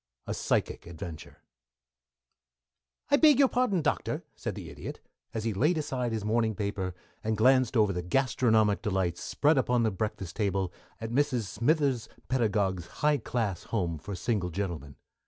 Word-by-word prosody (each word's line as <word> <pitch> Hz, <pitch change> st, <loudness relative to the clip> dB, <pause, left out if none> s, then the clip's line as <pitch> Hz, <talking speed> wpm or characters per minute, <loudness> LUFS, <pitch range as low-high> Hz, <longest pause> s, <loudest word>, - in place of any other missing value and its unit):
V -, -, -4 dB
A -, -, 0 dB
PSYCHIC -, -, -1 dB
VENTURE 85 Hz, -1 st, -9 dB, 1.7 s
"I 285 Hz, -, +7 dB
beg 300 Hz, -3 st, +6 dB
your 275 Hz, -1 st, +6 dB
pardon, 245 Hz, -10 st, +1 dB
Doctor," -, -, -1 dB
said -, -, -4 dB
the -, -, -7 dB
Idiot, -, -, -7 dB, 0.3 s
as 110 Hz, -2 st, -3 dB
he 115 Hz, -1 st, 0 dB
laid 150 Hz, -, +2 dB
aside 130 Hz, -6 st, -2 dB
his 110 Hz, -2 st, -2 dB
morning 110 Hz, 0 st, +1 dB
paper 100 Hz, -3 st, -3 dB, 0.3 s
and 110 Hz, 0 st, 0 dB
glanced 130 Hz, +1 st, +4 dB
over 105 Hz, -3 st, +4 dB
the 90 Hz, -, -2 dB
gastronomic 110 Hz, 0 st, +2 dB
delights 95 Hz, -5 st, -1 dB
spread 150 Hz, -1 st, +2 dB
upon 125 Hz, -2 st, +2 dB
the 110 Hz, -, +2 dB
breakfast 95 Hz, -3 st, -4 dB
table 95 Hz, -4 st, 0 dB, 0.3 s
at 115 Hz, 0 st, -5 dB
Mrs. 130 Hz, -2 st, +1 dB
Smithers 130 Hz, -, +1 dB, 0.2 s
Pedagog's 100 Hz, -8 st, +1 dB, 0.2 s
high 150 Hz, -1 st, +4 dB
class 110 Hz, -6 st, -2 dB
home 85 Hz, -8 st, -1 dB
for 100 Hz, +5 st, -6 dB
single 100 Hz, -1 st, -1 dB
gentlemen. 85 Hz, -7 st, -4 dB
110 Hz, 155 wpm, -29 LUFS, 95-130 Hz, 1.7 s, I